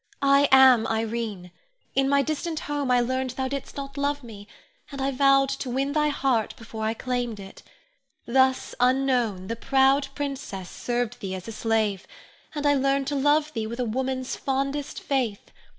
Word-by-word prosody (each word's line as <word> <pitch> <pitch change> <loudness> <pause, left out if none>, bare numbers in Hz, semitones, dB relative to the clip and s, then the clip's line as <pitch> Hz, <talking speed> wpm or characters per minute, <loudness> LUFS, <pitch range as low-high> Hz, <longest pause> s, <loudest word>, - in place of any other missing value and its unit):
I 275 +1 +5
am 260 -4 +7
Irene. 220 -5 -3 0.4
In 270 0 +2
my 280 0 +3
distant 310 +2 -3
home 290 -2 -2
I 250 -1 +4
learned 260 +2 -1
thou 265 0 -1
didst 275 +1 -6
not 275 0 -6
love 285 0 -1
me, 205 -3 -11 0.4
and 275 - -7
I 270 +1 0
vowed 275 0 +4
to 275 -1 -4
win 270 +3 -1
thy 300 0 +2
heart 265 -6 0
before 220 -1 -7
I 220 +1 0
claimed 245 -3 -3
it. 195 0 -11 0.6
Thus, 260 +1 +2
unknown, 250 -6 +1
the 230 - -3
proud 270 +3 +3
princess 265 -10 -5
served 240 -2 -3
thee 190 -1 -4
as 185 +2 -8
a - - -5
slave, 215 -3 -1 0.5
and 295 0 -3 0.2
learned 275 0 +1
to 290 - -2
love 295 +2 +2
thee 220 -2 -3
with 235 +2 -6
a 250 - 0
woman's 255 +2 -2
fondest 275 +1 -2
faith. 250 -7 -2
260 Hz, 170 wpm, -25 LUFS, 225-275 Hz, 0.6 s, am